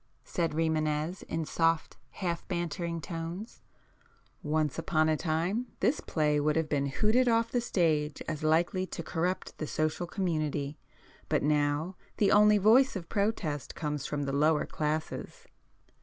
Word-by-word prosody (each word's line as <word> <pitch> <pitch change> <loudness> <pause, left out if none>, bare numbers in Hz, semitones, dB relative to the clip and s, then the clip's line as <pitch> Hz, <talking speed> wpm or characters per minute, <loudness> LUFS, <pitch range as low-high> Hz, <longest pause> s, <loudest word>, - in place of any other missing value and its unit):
said 170 -3 -1
Rimânez 155 +1 0
in 160 -1 -2
soft 165 +1 +1
half 170 -3 -4
bantering 170 -1 -3
tones—"Once 165 - -5
upon 155 -1 +2
a 155 - +3
time 175 +10 -1
this 245 +9 +2
play 150 -2 +1
would 150 +1 +1
have 160 -1 +1
been 140 -2 0
hooted 220 - +2
off 230 -1 +2
the 245 - +1
stage 155 -9 +1
as 155 -2 -3
likely 170 +4 +2
to 170 - -6
corrupt 180 +3 -2
the 155 - -3
social 155 +4 -1
community. 155 -5 -2 0.5
But - - +1
now 150 +4 +1 0.2
the 200 -2 +3
only 210 0 +6
voice 230 +7 +5
of 170 -3 -6
protest 200 -9 -1
comes 150 -3 -3
from 145 -1 -2
the 135 -1 -2
'lower' 150 +2 +3
classes." 155 +1 -3
165 Hz, 140 wpm, -30 LUFS, 150-185 Hz, 0.5 s, only